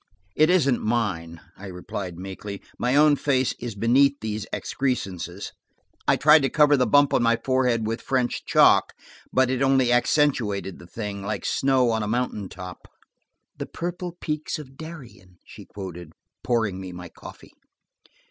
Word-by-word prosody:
"It 155 +2 +4
isn't 140 -9 +3
mine," 95 -8 -2
I 100 - -10
replied 90 -1 -6
meekly. 95 +2 -7 0.2
"My 125 +2 +1
own 150 0 +6
face 130 -3 +1
is 120 -3 -6
beneath 135 +6 +3
these 110 -1 -4
excrescences. 95 - -3 0.6
I - - +5
tried 150 +1 +6
to 135 - +1
cover 150 -1 +4
the 130 -2 +2
bump 145 0 +4
on - - +3
my 115 0 +3
forehead 125 -4 +1
with 115 +2 -3
French 130 -2 -1
chalk, - - +4 0.4
but 130 -1 +2
it 130 0 -1
only 135 -2 +3
accentuated 120 - +1
the 85 - -13
thing, 100 0 -6
like 100 +2 -4
snow 130 -3 +2
on 110 -1 0
a 105 - -2
mountain 110 -4 -2
top." 90 -1 -10 0.7
"'The - - -4
purple 175 0 -5
peaks 150 0 -3
of 135 -3 -11
Darien,'" 135 - -11
she - - -12
quoted, 90 -5 -9 0.3
pouring 110 -6 0
me 95 -1 -7
my 90 0 -8
coffee. - - -13
120 Hz, 155 wpm, -24 LUFS, 100-135 Hz, 0.7 s, own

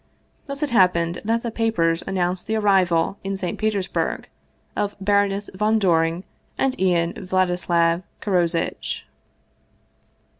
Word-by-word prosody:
Thus 280 +1 -4
it 290 - -1
happened 175 -5 +3
that 230 +2 0
the 235 - -3
papers 175 -8 +1
an 195 - -5
nounced 180 0 -1
the 220 - 0
arrival 190 -4 +2
in 195 0 -3
St. 180 -2 -4
Petersburg 205 -3 -1 0.5
of 205 0 -1
Baroness 200 0 +2
von 215 +3 +2
Doring 170 -3 +2 0.3
and 270 -1 +1
Ian 175 -2 +2
Vladislav 175 -2 +2 0.2
Karozitch. 175 -4 -1
190 Hz, 120 wpm, -22 LUFS, 170-210 Hz, 0.5 s, happened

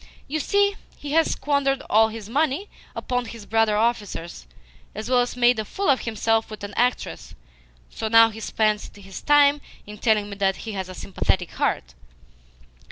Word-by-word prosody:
You 310 +3 -2
see, 405 +5 +2 0.2
he 290 - -7
has 325 +1 +3
squandered 275 -1 0
all 220 +1 +5
his 220 -2 -8
money 295 - 0 0.3
upon 245 -1 -2
his 225 -2 -9
brother 225 -1 +2
officers, 205 - -2 0.5
as 220 +4 -5
well 250 - +5
as 245 0 -1
made 240 -1 +4
a - - -1
fool 385 - 0
of 265 - 0
himself 225 0 0
with 215 -1 -9
an 205 0 -6
actress; 245 +1 -1 0.6
so 220 - -4
now 225 0 +6
he 220 - -9
spends 215 -1 0
his 195 -2 -10
time 290 0 +4 0.2
in 210 0 -10
telling 215 -3 +2
me 200 -1 -8
that 195 -1 +1
he 225 - -4
has 190 -2 -5
a 185 - -8
sympathetic 185 -2 -1
heart!" 65 - -2
225 Hz, 175 wpm, -23 LUFS, 210-270 Hz, 0.6 s, now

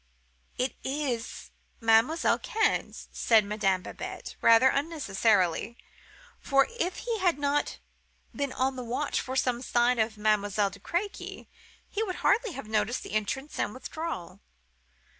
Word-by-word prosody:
'It 255 +1 -1
is 265 -4 -3 0.3
Mademoiselle 225 +8 +3
Cannes,' 440 0 -1
said 220 -3 +4
Madame 195 -3 0
Babette, - - -7
rather 230 +3 +7
unnecessarily; 230 - +1 0.6
for, 275 -1 +3
if 360 +2 0
he 465 -2 -1
had 355 -5 +2
not 290 0 0 0.6
been 280 -1 -2
on 260 +1 0
the 250 - -5
watch 240 +1 -1
for 260 - -5
some 250 -2 +1
sign 240 -1 +2
of 220 0 0
Mademoiselle 205 -1 +1
de 200 - -12
Crequy, 370 - -4 0.4
he 420 - -3
would 380 -5 -2
hardly 450 -2 +3
have 275 -7 -7
noticed 220 +2 0
the - - -9
entrance 240 +7 -2
and 210 - -1
withdrawal. 315 - -6
250 Hz, 135 wpm, -28 LUFS, 215-290 Hz, 0.6 s, rather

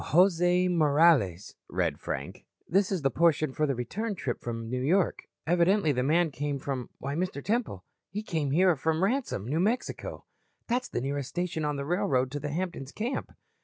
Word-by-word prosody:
"Jose 180 +1 +4
Morales," 150 - +3 0.2
read - - -1
Frank. - - -5 0.2
"This 195 +2 +2
is 185 -6 -1
the 135 - +2
portion 155 -2 +2
for 155 +2 +1
the 135 - 0
return 200 - -3
trip 125 -8 -3
from 115 -1 -4
New 125 +2 -2
York. 175 +7 +1 0.2
Evidently 175 +1 +3
the 125 -2 0
man 160 +4 +2
came 145 0 -2
from 135 -2 -4
why, 140 +1 -4
Mr. 170 -3 -3
Temple, 215 - -1 0.2
he 210 +3 -4
came 160 -8 -1
here 175 +4 +4
from 160 +4 0
Ransome, 230 - 0
New 145 +7 -1
Mexico. 220 +7 -2 0.4
That's 250 +2 -1
the - - -2
nearest 140 0 -3
station 175 -2 -2
on 150 -1 0
the 140 0 -3
railroad 135 -6 +1
to 145 - -3
the 145 +1 -4
Hampton's 165 -4 -4
camp." 235 +5 -3
160 Hz, 180 wpm, -28 LUFS, 135-180 Hz, 0.4 s, Jose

